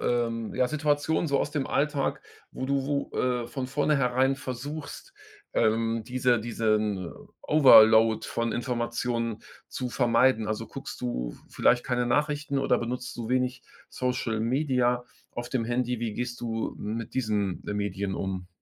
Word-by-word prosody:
ähm, 115 -2 -1
ja, 125 - +2
Situationen 150 +3 0
so 140 -2 +1
aus - - -1
dem 145 -3 -2
Alltag, 145 -1 0 0.3
wo - - -5
du 135 0 0
wo, 140 -1 -1
äh, 125 -2 0
von 130 -2 -4
vorneherein 135 -2 +2
versuchst, 145 - -7 0.4
ähm, 115 0 +1
diese 125 -1 +2
diesen 110 -5 0 0.3
Overload 110 -6 +7
von 115 0 -1
Informationen 120 -1 -2 0.3
zu 125 -1 -4
vermeiden. 120 -2 +3
Also, 110 - -3
guckst - - -8
du - - -2
v - - -15
vielleicht 120 0 +3
keine 125 -1 0
Nachrichten 145 +3 0
oder 130 -2 +2
benutzt 125 +1 -4
du 115 -2 -4
wenig 125 0 0 0.3
Social-Media 125 +1 0 0.3
auf 120 0 -6
dem 120 -4 -1
Handy? 120 0 -1
Wie 115 -3 -2
gehst 120 0 -4
du 115 -1 -3
mit 110 +2 -4
diesen, 105 -7 -1
äh, 105 - -2
Medien 100 -1 -2
um? 95 -2 -4
120 Hz, 145 wpm, -27 LUFS, 115-130 Hz, 0.4 s, Overload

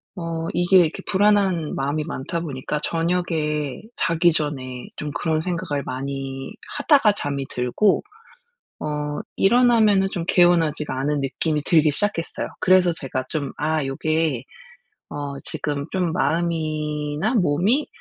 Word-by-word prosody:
어 165 -2 -4
이게 175 +2 +5
이렇게 165 -3 +1
불안한 195 -5 +2
마음이 145 +3 -1
많다 170 +2 -4
보니까 150 -1 -3
저녁에 165 -4 -1
자기 165 0 +3
전에 130 -5 -3
좀 150 -1 -5
그런 155 +1 -1
생각을 170 -5 -2
많이 135 0 -5 0.2
하다가 285 -7 +4
잠이 140 -1 -3
들고 125 +12 +1 0.8
어 - - -4 0.5
일어나면은 220 -3 +4
좀 170 - -3
개운하지가 165 -6 +3
않은 145 +2 0
느낌이 150 +2 -1
들기 155 -3 +4
시작했어요. 165 +1 -2
그래서 185 -2 +4
제가 130 -4 -4
좀 145 -4 -3
'아 155 +1 0
요게 150 -1 0 0.7
어 145 -1 -5
지금 145 -2 -3
좀 180 -4 0
마음이나 155 - -1
몸이 200 - +2
160 Hz, 275 characters per minute, -23 LUFS, 145-180 Hz, 0.8 s, 이게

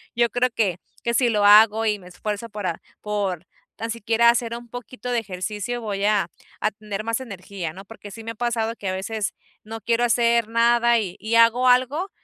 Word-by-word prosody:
yo 235 0 +3
creo 245 +2 +1
que 195 -6 +1 0.3
que 235 - 0
si 245 +1 +3
lo 210 -3 +1
hago 215 +2 +7
y 210 -2 +1
me 180 - -14
esfuerzo 210 +5 -5
por, 210 -2 -6
a 170 -3 -2 0.2
por 200 -5 -2 0.3
tan 225 - -5
siquiera 230 +1 +3
hacer 235 -1 +1
un 240 0 -10
poquito 245 +1 -8
de 240 - +1
ejercicio, 210 +4 -4
voy 200 -2 -2
a 205 -4 +2 0.3
a 215 - +1
tener 210 0 -6
más 230 +1 -1
energía, 195 -8 -6
¿no?, 195 - -10
porque 205 -1 -11
sí 225 +2 -9
me 225 - -5
ha - - -10
pasado 230 -1 -1
que 195 - -6
a 185 - -1
veces 205 +2 -3 0.3
no 225 +1 -8
quiero 235 +3 +1
hacer 235 -1 +3
nada 235 0 +3
y 185 -4 -5
y 220 +2 -1
hago 230 +2 +5
algo, 260 +9 +3
225 Hz, 210 wpm, -23 LUFS, 205-235 Hz, 0.3 s, hago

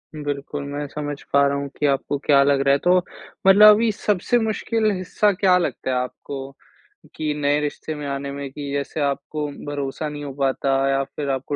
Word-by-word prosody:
बिल्कुल, 145 -1 -4
मैं 145 +1 -3
समझ 145 0 -5
पा 140 0 +5
रहा 140 0 0
हूँ 140 0 -3
कि 150 - 0
आपको 140 +1 0
क्या 140 -2 +5
लग 140 0 +2
रहा 140 0 +3
है। - - +4
तो 180 +1 +5 0.5
मतलब 205 +2 +9
अभी 225 +1 +2
सबसे 210 +2 0
मुश्किल 220 0 0
हिस्सा 195 +2 +1
क्या 185 -1 +3
लगता 175 -6 -2
है 130 - +1
आपको? 135 +2 -5 0.6
कि 155 -1 -2
नए 145 0 +1
रिश्ते 150 +1 -4
में 150 -1 -6
आने 140 0 -4
में 140 0 -6
कि 140 0 -6
जैसे 140 +2 -3
आपको 145 +2 -2 0.2
भरोसा 145 +1 -3
नहीं 145 0 -7
हो 140 -2 -6
पाता 135 0 +1
या 135 0 +1
फिर 140 +1 -6
आपको 135 +1 -2
145 Hz, 195 wpm, -22 LUFS, 140-155 Hz, 0.6 s, मतलब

